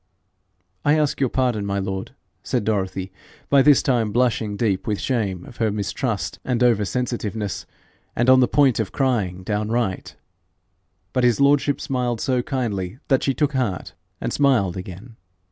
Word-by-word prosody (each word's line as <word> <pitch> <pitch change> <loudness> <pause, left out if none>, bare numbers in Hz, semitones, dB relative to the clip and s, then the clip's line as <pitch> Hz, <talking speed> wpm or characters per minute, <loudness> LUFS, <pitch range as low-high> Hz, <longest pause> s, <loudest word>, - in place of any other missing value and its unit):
'I 150 +2 +4
ask 150 -2 0
your 135 -2 +2
pardon, 125 -5 0
my 100 0 -2
lord,' 95 0 -4 0.3
said 125 -4 -1
Dorothy, 95 -3 -2 0.4
by 140 -1 +6
this 145 +1 +5
time 120 -5 +1
blushing 115 -3 0
deep 100 -5 0
with 105 -2 -1
shame 100 -9 -2
of 120 - -13
her 110 -2 +1
mistrust 100 -2 -3
and 125 -1 0
over 115 -4 +3
sensitiveness, 110 -5 -3 0.5
and 120 - +1
on 130 0 +7
the 125 - +4
point 135 -3 +3
of 110 -4 -2
crying 105 -9 0
downright. 105 0 -2 1.0
But 125 - +1
his 120 -3 +3
lordship 140 0 +3
smiled 125 -3 -2
so 130 -1 +1
kindly 115 -7 -3
that 135 -2 +3
she 135 - 0
took 150 -1 0
heart 120 -9 -2 0.3
and - - -3
smiled 125 -11 +2
again. 95 +5 -9
115 Hz, 160 wpm, -22 LUFS, 100-130 Hz, 1.0 s, on